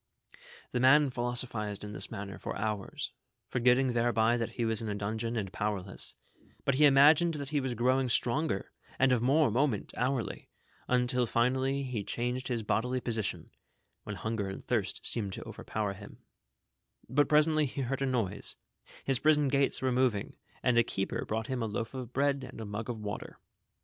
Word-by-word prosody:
The 125 - 0
man 135 +2 +6
philosophized 120 -4 -3
in 105 0 -6
this - - +1
manner 100 -1 -6
for - - -4
hours, 105 -2 -3 0.4
for - - -1
getting 125 +1 +4
thereby 115 -1 +3
tliat 115 -2 -2
he 120 - -1
was 115 -1 0
in 110 - -3
a 105 - -2
dungeon 110 +3 -2
and 95 -4 -3
powerless; 100 -3 -3 0.5
but 140 - +3
he 150 +3 +5
imagined 150 +4 +6
that 140 -2 -5
he 150 0 +1
was 130 -3 -2
growing 130 +2 +2
stronger 120 -3 0 0.3
and 135 0 +4
of 120 - +2
more 140 +1 +4
moment 125 -2 0
hourly, 125 -1 -2 0.4
until 125 0 +2
linally 130 +4 +1
he 115 -5 -3
changed 125 +4 -2
his 120 -3 -1
bodily 125 +5 0
position, 115 -4 -3 0.6
wlien 105 - -4
hunger 105 0 -2
and 95 - -7
thirst 110 -6 -1
seemed 100 -5 -1
to - - -7
overpower 105 -2 -3
him; 100 +1 -13 0.8
but 145 +1 +2
presently 155 0 +4
he 135 - -4
heard 135 +1 -2
a 135 - +1
noise, 110 -6 -1 0.5
his 135 -3 +1
prison 150 -2 +4
gates 140 -1 +1
were 130 - +2
moving, 125 -5 +1 0.3
and 120 -2 +4
a - - +6
keeper 95 -3 -3
brought 110 +1 -2
him 130 +1 -3
a 115 - 0
loaf 115 +2 -4
of 125 -3 -6
bread 140 0 +1
and 130 -1 -9
a 110 - -5
mug 105 +3 -5
of 120 - -3
water. 105 -1 -6
120 Hz, 180 wpm, -31 LUFS, 110-130 Hz, 0.8 s, man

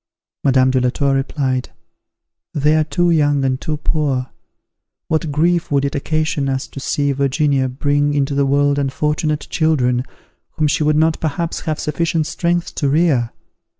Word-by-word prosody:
Madame 130 -1 +4
de 130 -1 +1
la 125 - +2
Tour 140 +2 0
replied, 135 -1 -1 0.9
"They 150 +1 +3
are 155 - +3
too 175 +3 +1
young 145 -3 +2
and 130 0 -1
too 155 -1 -2
poor. 140 -5 -1 0.8
What 160 -1 0
grief 170 +4 +1
would 140 -1 +1
it 140 - -2
occasion 155 -1 -1
us 135 0 -2
to - - -8
see 145 +1 0
Virginia 140 0 +1
bring 145 +2 0
into 140 0 0
the 140 0 +1
world 145 +1 +2
unfortunate 150 +2 -1
children, 125 -7 +1 0.5
whom 155 -1 +1
she 150 - 0
would 150 0 +2
not 160 +1 +2
perhaps 160 +2 -2
have 155 - -1
sufficient 160 0 -1
strength 175 +2 -1
to 145 - -1
rear! 140 -6 +2
145 Hz, 160 wpm, -18 LUFS, 135-155 Hz, 0.9 s, Madame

